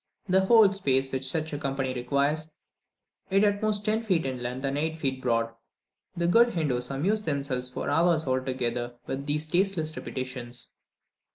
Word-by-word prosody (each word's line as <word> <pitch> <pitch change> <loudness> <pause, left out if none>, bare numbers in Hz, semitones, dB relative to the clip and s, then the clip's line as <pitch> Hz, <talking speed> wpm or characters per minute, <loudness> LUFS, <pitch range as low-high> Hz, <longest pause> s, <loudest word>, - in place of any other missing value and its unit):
The 190 0 +3
whole 220 -3 +7
space 135 -9 0
which 130 0 -2
such 155 +1 -2
a 145 - -3
company 135 -2 -2
requires, 140 +5 0 0.8
is 195 +2 +3
at 205 -1 +2
the 215 - +1
most 205 -1 +1
ten 215 +1 +1
feet 185 -8 +1
in 130 -2 -3
length 125 +3 -4
and 135 0 -1
eight 145 -3 -2
broad. 115 -2 0 0.6
The 170 - 0
good 235 +6 +4
Hindoos 125 -7 0
amuse 185 +11 0
themselves 140 -7 -1
for 125 - -5
hours 160 +2 +3
together 130 -2 -2
with 140 +2 -4
these 150 +1 0
tasteless 175 -2 0
repetitions. 125 -2 -5
140 Hz, 165 wpm, -27 LUFS, 130-175 Hz, 0.8 s, whole